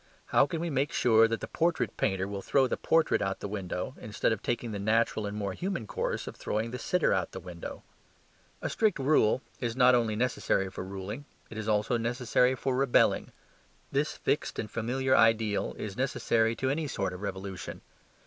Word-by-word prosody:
How 140 - +4
can 165 0 -3
we 170 -1 -2
make 140 +2 0
sure 115 -4 +5
that 115 0 -2
the - - -4
portrait 170 0 0
painter 95 -2 0
will 100 -1 -5
throw 135 +6 +3
the 125 - 0
portrait 160 -1 +2
out 95 -1 -2
of 100 - -4
window 95 +1 -3
instead 105 +1 -1
of 110 - -1
taking 120 -1 -2
the 100 - -4
natural 110 0 +1
and 100 +1 -5
more 100 -2 -2
human 180 - -3
course - - -2
of - - -7
throwing 110 +2 -2
the 125 - -5
sitter 180 - +2
out - - -1
of - - -7
window? - - -8 0.8
A - - -1
strict 215 -2 +2
rule 135 -4 +3 0.2
is 120 -2 -2
not 125 -1 +6
only 115 -3 +2
necessary 105 -5 0
for 95 - -6
ruling; 100 +8 -6 0.3
it 110 - -7
is 110 - -5
also 105 +3 +2
necessary 125 +2 +2
for 130 +1 -1
rebelling. 135 -1 +3 0.6
This - - 0
fixed - - -1
and 105 - -4
familiar 130 +3 +1
ideal 110 -2 +3
is 105 -2 -5
necessary 115 -3 +1
to 130 +3 0
any 155 +2 -1
sort 95 -8 -2
of 90 - -8
revolution. 95 -2 -5
115 Hz, 195 wpm, -29 LUFS, 105-130 Hz, 0.8 s, not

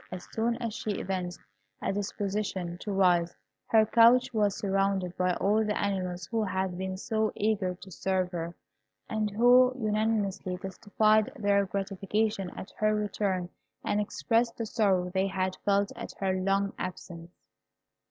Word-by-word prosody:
As 180 -1 -7
soon 230 +1 0
as 230 -2 -3
she 215 -3 -3
evinced 180 -2 -3 0.4
a - - -1
disposition 195 -3 -3
to 205 - -5
rise, 175 -3 +3 0.3
her 220 -1 +5
couch 235 +3 +5
was 205 -3 +1
surrounded 195 -3 0
by 180 -1 +1
all 210 +3 +2
the 210 -1 -1
animals 185 -3 -2
who 225 -1 +1
had 190 -2 -1
been 190 +1 -4
so 220 +2 0
eager 200 -4 0
to 190 +1 -13
serve 185 0 -1
her, 170 -1 -4 0.5
and 215 -1 -1
who 245 +4 +5
unanimously 210 -4 0
testified 215 +3 +1
their 200 -1 +2
gratification 195 +1 -1
at - - -7
her 215 0 +2
return, 200 -3 -1 0.4
and 210 - +1
expressed 225 +6 0
the 230 - -2
sorrow 190 -5 +1
they 190 0 +2
had 185 -1 -1
felt 200 0 +2
at - - -7
her 190 -1 -1
long 195 +1 0
absence. 175 -2 -6
195 Hz, 150 wpm, -29 LUFS, 185-215 Hz, 0.5 s, her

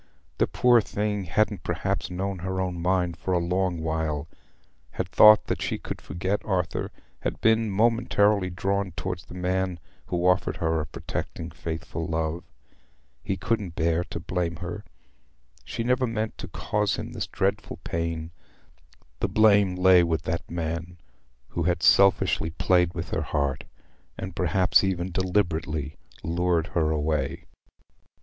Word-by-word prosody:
The - - +3
poor 120 -2 +4
thing 105 -1 -2
hadn't 105 +2 +1
perhaps - - -2
known 95 +1 -3
her 95 +1 -3
own 90 -2 -2
mind 90 -1 +1
for 95 - -2
a - - +4
long 90 +1 0
while; 80 -2 -1 0.7
had - - -2
thought 105 0 +7
that - - -2
she - - -1
could - - -7
forget 95 +4 -2
Arthur; 90 -3 -1 0.3
had - - -3
been 110 0 +3
momentarily 105 -2 +2
drawn 95 +1 -1
towards 90 0 -4
the - - -11
man 90 0 -1 0.3
who 90 -2 -1
offered 90 +1 +2
her 80 -1 0
a 75 - -5
protecting, - - -5
faithful 80 0 -5
love. 80 +1 -2 0.8
He 95 - -2
couldn't 95 -2 -2
bear 85 +1 +1
to - - -6
blame 85 -1 -2
her: 90 +5 -6 0.8
she 115 - -3
never 125 +1 +2
meant 110 -1 -2
to - - -6
cause 105 -1 -1
him - - -6
this - - -4
dreadful - - -1
pain. 85 0 -3 0.9
The - - 0
blame 100 -3 +4
lay 90 -1 +6
with 80 -2 0
that 85 0 -3
man 85 +1 -4 0.5
who 85 - -3
had 90 0 0
selfishly 95 -4 +4
played 90 +1 +2
with 85 0 -5
her 80 - 0
heart—had 70 -3 -5
perhaps 95 0 +3
even 95 -1 -1
deliberately 85 -5 -1 0.3
lured 85 0 +1
her 80 -2 +2
away. 75 -2 -1
90 Hz, 145 wpm, -26 LUFS, 85-95 Hz, 0.9 s, thought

